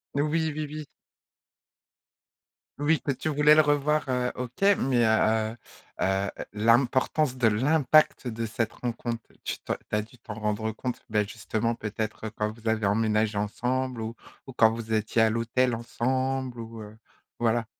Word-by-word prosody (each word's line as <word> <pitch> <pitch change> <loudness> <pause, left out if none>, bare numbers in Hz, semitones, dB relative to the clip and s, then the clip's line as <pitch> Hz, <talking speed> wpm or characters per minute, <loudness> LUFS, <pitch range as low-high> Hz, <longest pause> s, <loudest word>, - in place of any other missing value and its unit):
Heu, 140 - +2
oui, 160 +1 0
oui, 155 -1 -3
oui. 155 0 -6 1.9
Oui, 150 +2 +3
toi 140 - -1
tu 155 - -3
voulais 150 0 +5
le 155 - +7
revoir, 150 0 +2
heu, 125 -1 0
OK, 125 +3 -7 0.2
mais 125 -3 +2
heu 110 0 +2 0.5
heu, 95 +1 +1 0.2
l'importance 125 +5 +2
de 120 - +3
l'impact 145 +5 +3
de 115 -1 -3
cette 110 0 -2
rencontre, 120 -1 -4 0.2
tu - - -3
tu - - -1 0.2
as 105 0 +2
dû 110 +4 -14
t'en 110 -1 -8
rendre 110 +1 -2
compte, 125 +3 -4
ben 105 -1 +1
justement 115 +2 -2
peut-être 110 0 -4
quand 105 0 -1
vous 115 0 -10
avez 110 -2 +1
emménagé 110 0 +1
ensemble? 125 +4 -1
Ou 115 +1 -5 0.3
ou 130 - -8
quand 110 -2 +5
vous 115 -1 -6
étiez 110 +1 +1
à 110 - +5
l'hôtel 115 +2 +1
ensemble 130 +2 -2
ou 115 0 -8
heu, 105 +1 -11 0.4
voilà. 115 0 +1
115 Hz, 160 wpm, -27 LUFS, 110-130 Hz, 1.9 s, le